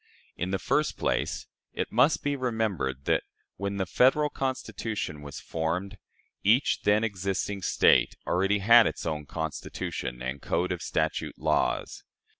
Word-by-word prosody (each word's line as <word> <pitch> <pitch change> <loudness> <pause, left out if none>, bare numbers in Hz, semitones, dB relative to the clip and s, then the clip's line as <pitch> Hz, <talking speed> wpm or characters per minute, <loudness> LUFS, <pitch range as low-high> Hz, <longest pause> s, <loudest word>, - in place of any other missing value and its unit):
In 90 - -3
the 95 - 0
first 145 +10 0
place, - - -1 0.3
it - - -3
must 130 +7 +3
be 145 0 0
remembered 110 - -2
that, - - +2 0.4
when 100 0 -3
the 95 - 0
Federal 140 - +3
Constitution 115 - -3
was 70 -1 -8
formed, 90 +5 -3 0.4
each 115 +7 +3
then 105 +2 +4
existing 100 -1 -2
State - - +4
already 95 +3 +2
had 115 +3 +7
its - - -4
own 75 -3 -3
Constitution 75 -6 -4
and 65 +2 -4
code 90 +1 0
of 90 -1 -3
statute 80 -3 -2
laws. - - 0
100 Hz, 140 wpm, -28 LUFS, 80-115 Hz, 0.4 s, had